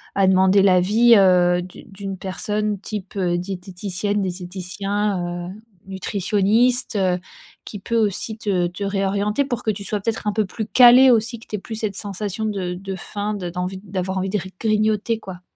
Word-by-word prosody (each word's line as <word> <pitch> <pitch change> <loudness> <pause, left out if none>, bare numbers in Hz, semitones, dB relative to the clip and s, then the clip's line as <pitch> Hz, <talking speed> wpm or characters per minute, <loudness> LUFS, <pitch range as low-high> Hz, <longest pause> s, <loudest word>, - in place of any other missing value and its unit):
à 195 - +3
demander 190 +1 +5
l'avis, 200 +6 +5
heu, 180 -2 +4
d'une 185 +3 -12
d'une 195 -1 -6
personne 205 +2 -2
type, 200 -1 -6
heu, 175 -2 +1
diététicienne, 190 +2 -3
diététicien, 180 0 -3
heu, - - -8 0.3
nutritionniste, 205 +6 +1
heu, 185 -2 +1 0.5
qui 205 - -7
peut 230 +4 -2
aussi 215 +1 -1
te 190 -5 0
te 180 +3 -7
réorienter 200 +5 0
pour 245 -3 -3
que - - -1
tu 200 0 -7
sois 210 +1 -2
peut-être 225 +1 -3
un 210 - +1
peu 215 -1 +1
plus 220 +3 -5
calé 255 +1 +7
aussi, 230 +1 +1
que 230 - -15
tu - - -4
aies - - -7
plus 220 - -7
cette 215 -2 -3
sensation 205 +1 -4
de 190 -4 -2
de 195 +1 -6
faim, 205 +3 -4
d 180 -3 -5
d'envie, 180 +2 -4
d'avoir 190 -1 -3
envie 190 +1 -2
de 210 - 0
gr 190 - -7
grignoter 215 0 +1
quoi. 185 -4 -10
200 Hz, 180 wpm, -21 LUFS, 185-215 Hz, 0.5 s, calé